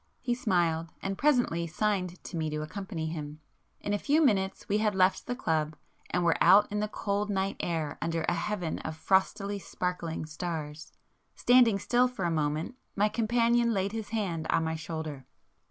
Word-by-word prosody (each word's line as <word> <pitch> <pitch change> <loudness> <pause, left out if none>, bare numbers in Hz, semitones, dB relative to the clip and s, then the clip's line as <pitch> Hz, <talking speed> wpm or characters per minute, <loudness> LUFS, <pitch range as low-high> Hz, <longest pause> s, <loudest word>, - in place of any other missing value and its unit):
He 245 -1 -1
smiled,—and 175 -4 -1
presently 245 - +2
signed 185 0 -1
to - - -7
me 160 -1 -1
to 150 0 -3
accompany 185 0 -5
him. 150 -2 -6 0.4
In 205 - -2
a 205 - +1
few 290 +7 +2
minutes 195 -10 +1
we 205 +1 +1
had 210 -2 +1
left 185 0 +2
the 245 - -1
club, 155 -9 -1 0.3
and 180 - 0
were 170 - +3
out 205 +2 +7
in 210 - -1
the 210 - 0
cold 205 0 -2
night 195 -1 0
air 160 -4 -2
under 165 -1 -1
a - - +1
heaven 180 -2 -2
of 160 0 -6
frostily 200 +3 +1
sparkling 180 -4 -3
stars. 155 -1 -5 0.4
Standing 245 -4 +5
still 245 +5 +3
for 245 -8 -4
a 170 - +1
moment, 155 +8 -1 0.2
my 210 +1 +3
companion 235 +1 +2
laid 195 +1 0
his 220 -2 -5
hand 185 -8 -2
on 165 - +2
my 160 0 -1
shoulder. 155 -4 -5
190 Hz, 175 wpm, -29 LUFS, 160-210 Hz, 0.4 s, out